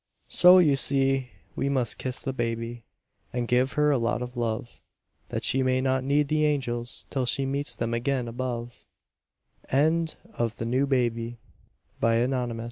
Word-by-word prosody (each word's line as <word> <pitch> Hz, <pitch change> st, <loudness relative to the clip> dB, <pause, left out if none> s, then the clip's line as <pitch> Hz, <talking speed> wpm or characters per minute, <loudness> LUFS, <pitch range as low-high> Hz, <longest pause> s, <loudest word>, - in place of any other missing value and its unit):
So, 180 Hz, +1 st, +7 dB
you 155 Hz, -6 st, +5 dB
see, 135 Hz, -1 st, +1 dB, 0.3 s
we 140 Hz, -, -1 dB
must 130 Hz, -5 st, 0 dB
kiss 130 Hz, -1 st, -4 dB
the 135 Hz, -, -2 dB
baby, 115 Hz, -1 st, -3 dB, 0.5 s
And 120 Hz, -1 st, -2 dB
give 125 Hz, +3 st, +2 dB
her 150 Hz, -1 st, +3 dB
a 135 Hz, -, +2 dB
lot 120 Hz, +1 st, 0 dB
of 125 Hz, +1 st, -8 dB
love, 120 Hz, 0 st, -3 dB, 0.5 s
That -, -, -3 dB
she 135 Hz, -, +2 dB
may 130 Hz, 0 st, +2 dB
not 130 Hz, 0 st, +1 dB
need 140 Hz, +2 st, +2 dB
the 155 Hz, +1 st, +1 dB
angels 125 Hz, -5 st, -1 dB
Till 130 Hz, -3 st, -1 dB
she 135 Hz, +2 st, +1 dB
meets 140 Hz, +2 st, -2 dB
them 115 Hz, 0 st, -2 dB
again 125 Hz, +1 st, -1 dB
above. 120 Hz, 0 st, -5 dB, 0.9 s
DOLLY'S 160 Hz, +4 st, +2 dB, 1.8 s
PROMENADE. 120 Hz, 0 st, +1 dB
130 Hz, 140 wpm, -26 LUFS, 120-140 Hz, 1.8 s, So